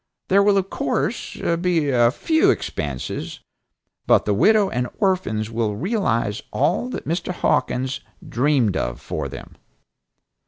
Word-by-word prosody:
There 195 +1 +5
will 200 0 +4
of 195 0 -1
course - - -2 0.3
be 165 -5 +1
a 120 -2 +4
few 320 - +2
expenses, 70 -5 -3 0.7
but - - +4
the 105 - +1
widow 210 - +4
and 125 -5 -2
orphans 180 - 0
will 110 -2 -1
realize 115 - -1
all 175 - 0
that - - -6
Mr. 170 +3 -2
Hawkins, 130 -6 0 0.3
dreamed 125 -6 +2
of - - -2
for 75 -3 -4
them." - - -10
135 Hz, 130 wpm, -22 LUFS, -, 0.7 s, There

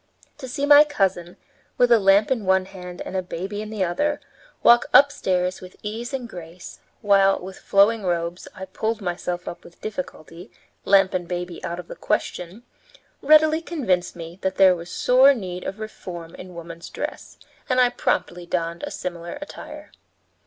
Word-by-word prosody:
To 260 - -7
see 280 +3 -2
my 290 0 +9
cousin, 190 - -1 0.4
with 245 -1 +4
a 235 - +7
lamp 195 +3 +4
in 240 -5 0
one 190 0 +2
hand 180 -2 -9
and - - -7
a 190 - +1
baby 190 +3 -5
in 215 - -7
the 215 -3 -2
other, 290 +13 0 0.4
walk 240 0 +6
upstairs 185 -10 +3
with 185 0 -12
ease 225 +3 -5
and 260 -3 -4
grace, 175 -4 -10 0.2
while, 195 -1 +4
with 190 +1 -9
flowing 210 +3 +3
robes, 175 -1 -2
I 190 - -7
pulled 220 +4 -3
myself 175 -2 -4
up 175 - -7
with 170 - -17
difficulty, 180 -3 -7 0.4
lamp 195 -1 +4
and 180 -2 -2
baby 175 0 -5
out 170 - -4
of 175 - -9
the - - -8
question, 180 +6 -3 0.6
readily 310 +2 +5
convinced 225 - -1
me 170 +1 -9
that 190 0 -1
there 190 -2 +6
was 170 0 -9
sore 265 +3 +5
need 185 -5 -6
of 195 - -4
reform 175 -6 -8
in 180 -1 -11
woman's 170 0 -9
dress, - - -6 0.3
and 255 0 +2
I 250 -1 +5
promptly 175 -7 -2
donned 170 -1 -2
a - - -4
similar 175 +4 -6
attire. 295 - -10
190 Hz, 175 wpm, -23 LUFS, 175-225 Hz, 0.6 s, my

